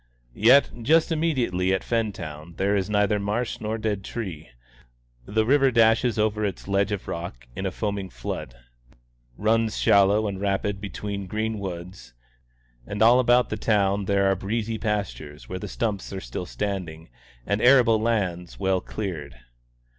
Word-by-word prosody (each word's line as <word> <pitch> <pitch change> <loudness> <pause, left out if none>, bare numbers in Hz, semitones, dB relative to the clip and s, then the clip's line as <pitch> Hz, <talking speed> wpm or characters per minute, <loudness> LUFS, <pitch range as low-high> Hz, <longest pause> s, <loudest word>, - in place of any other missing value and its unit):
Yet 125 - +5
just 160 +8 +3
immediately 120 - +1
at 95 - -4
Fentown 85 -8 -3
there 100 +1 +1
is 95 0 -1
neither 105 0 +2
marsh 105 +4 -2
nor 110 +1 -2
dead 105 -3 -2
tree; 95 -9 -6 0.8
the 110 - +1
river 135 +2 +4
dashes 115 -1 +3
over 105 0 +1
its 100 -2 -3
ledge 100 +1 +1
of 100 -2 -4
rock 85 -8 -6
in 95 - -2
a - - -2
foaming 100 -1 -3
flood, - - -6 0.8
runs 110 0 +1
shallow 100 +2 +4
and 100 -2 -4
rapid 100 0 -1
between 100 -1 -5
green 110 +2 -2
woods, 90 -6 -7 0.7
and 105 +2 0
all 120 +3 +7
about 125 0 +4
the - - -2
town 100 -2 +1
there 100 0 +2
are 95 0 +3
breezy 110 +3 -3
pastures 100 -9 -4
where 95 - -5
the - - -6
stumps 105 -4 -3
are 95 - -4
still 90 -1 -6
standing, 90 -6 -4 0.4
and 100 +1 0
arable 120 -4 +5
lands 95 -7 -1
well 95 -1 +1
cleared. 80 - -5
100 Hz, 155 wpm, -25 LUFS, 95-110 Hz, 0.8 s, all